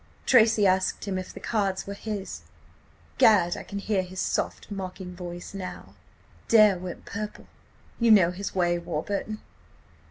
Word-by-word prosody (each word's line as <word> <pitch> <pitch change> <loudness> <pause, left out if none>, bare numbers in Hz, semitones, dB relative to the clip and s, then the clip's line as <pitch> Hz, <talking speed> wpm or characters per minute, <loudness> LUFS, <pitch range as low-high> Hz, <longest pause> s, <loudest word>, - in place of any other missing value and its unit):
"Tracy 225 -4 +5
asked 185 0 +1
him 190 -1 -1
if 185 - -7
the - - -10
cards 200 -4 -1
were 200 - -5
his. 205 -1 -5 0.8
Gad! 180 -6 +5
I - - -6
can 200 - -7
hear 200 -1 0
his 185 0 -8
soft, - - -2
mocking 185 -2 -6
voice 175 0 -7
now! 190 -2 -7 0.5
"Dare 215 -5 +6
went 180 -1 -7
purple–you 215 +2 -5
know 190 -6 +6
his 195 +2 -6
way, 175 -1 +2
Warburton. 195 +6 -3
195 Hz, 140 wpm, -26 LUFS, 180-210 Hz, 0.8 s, Dare